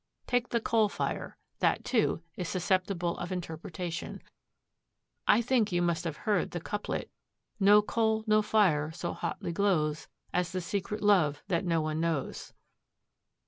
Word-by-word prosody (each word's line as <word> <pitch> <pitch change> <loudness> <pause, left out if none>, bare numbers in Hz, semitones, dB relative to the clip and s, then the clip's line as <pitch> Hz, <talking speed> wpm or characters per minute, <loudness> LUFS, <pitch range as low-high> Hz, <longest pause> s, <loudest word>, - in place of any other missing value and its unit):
Take 245 0 0
the 235 - +1
coal 220 -1 +2
fire. - - -3 0.2
That, - - +1
too, 220 -8 +1
is 180 -2 -4
susceptible 185 -1 0
of 175 +1 -4
interpretation. 170 -1 -5 1.0
I 235 - +5
think 230 -4 +2
you 175 0 +1
must 170 0 0
have 160 -2 -3
heard 205 -4 +2
the 175 - -4
couplet: 205 +5 -4 0.5
"'No 205 +1 +6
coal, 220 0 +1
no 215 -1 +4
fire 190 -9 +3
so 170 +1 -4
hotly 170 0 -4
glows 155 -6 +1 0.3
As 180 -1 0
the 185 - -1
secret 200 +4 -3
love 160 -8 +3
that 170 +1 +1
no 165 -2 +2
one 155 0 -2
knows.'" 165 -5 -2
180 Hz, 145 wpm, -30 LUFS, 165-210 Hz, 1.0 s, No